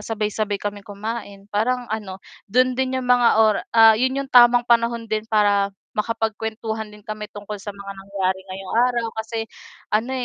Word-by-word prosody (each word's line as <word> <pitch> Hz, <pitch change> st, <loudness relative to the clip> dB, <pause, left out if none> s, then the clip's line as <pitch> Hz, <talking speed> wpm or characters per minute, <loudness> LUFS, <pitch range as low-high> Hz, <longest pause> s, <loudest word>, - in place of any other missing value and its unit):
sabay-sabay 210 Hz, -1 st, -2 dB
kaming 205 Hz, 0 st, -5 dB
kumain 205 Hz, -1 st, -6 dB
parang 245 Hz, +4 st, 0 dB
ano 205 Hz, -4 st, -4 dB, 0.3 s
do'n 255 Hz, +4 st, +3 dB
din 260 Hz, +1 st, -1 dB
'yong 260 Hz, -, -3 dB
mga 245 Hz, -1 st, +5 dB
ora 220 Hz, -2 st, +4 dB, 0.2 s
ah, 225 Hz, 0 st, +9 dB
'yun 260 Hz, +4 st, 0 dB
'yung 275 Hz, -1 st, -3 dB
tamang 240 Hz, -1 st, +7 dB
panahon 235 Hz, -1 st, +2 dB
din 215 Hz, 0 st, -3 dB
para 205 Hz, -2 st, +3 dB, 0.2 s
makapagkuwentuhan 220 Hz, 0 st, -3 dB
din 210 Hz, 0 st, -16 dB
kami 215 Hz, -1 st, -6 dB
tungkol 205 Hz, 0 st, -8 dB
sa 205 Hz, -, -9 dB
mga 200 Hz, 0 st, -7 dB
nangyari 190 Hz, -1 st, -2 dB
ngayong 190 Hz, 0 st, -7 dB, 0.2 s
araw 235 Hz, -2 st, -1 dB
kasi 225 Hz, 0 st, -4 dB, 0.5 s
ano 225 Hz, +5 st, +1 dB
220 Hz, 165 wpm, -22 LUFS, 205-235 Hz, 0.5 s, ah